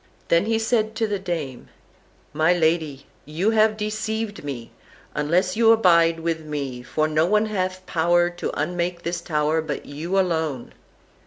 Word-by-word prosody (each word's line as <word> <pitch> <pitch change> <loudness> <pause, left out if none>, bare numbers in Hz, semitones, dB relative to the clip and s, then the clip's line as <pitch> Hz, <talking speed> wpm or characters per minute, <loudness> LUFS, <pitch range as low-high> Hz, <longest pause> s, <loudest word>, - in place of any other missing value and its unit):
Then 170 +3 +4
said 225 0 +1
he 220 - -12
to 225 0 -1
the 205 -2 -2
dame: 165 -9 -5 0.7
"My 160 +3 +3
lady, 160 -5 0 0.2
you 170 +9 0
have 215 -1 +3
deceived 215 -1 -3
me, 130 -5 -6 0.4
unless 175 +5 +1
you 225 0 +5
abide 170 -6 +4
with 165 -1 -2
me, 140 -5 -4
for 155 +5 -1
no 155 +1 +2
one 210 +3 +3
hath 185 -3 -3
power 175 +1 +2
to 175 - -4
unmake 175 0 -2
this 170 0 -3
tower 155 -1 0
but 150 -3 -5
you 165 +7 -3
alone." 160 -8 -1
170 Hz, 155 wpm, -23 LUFS, 155-195 Hz, 0.7 s, you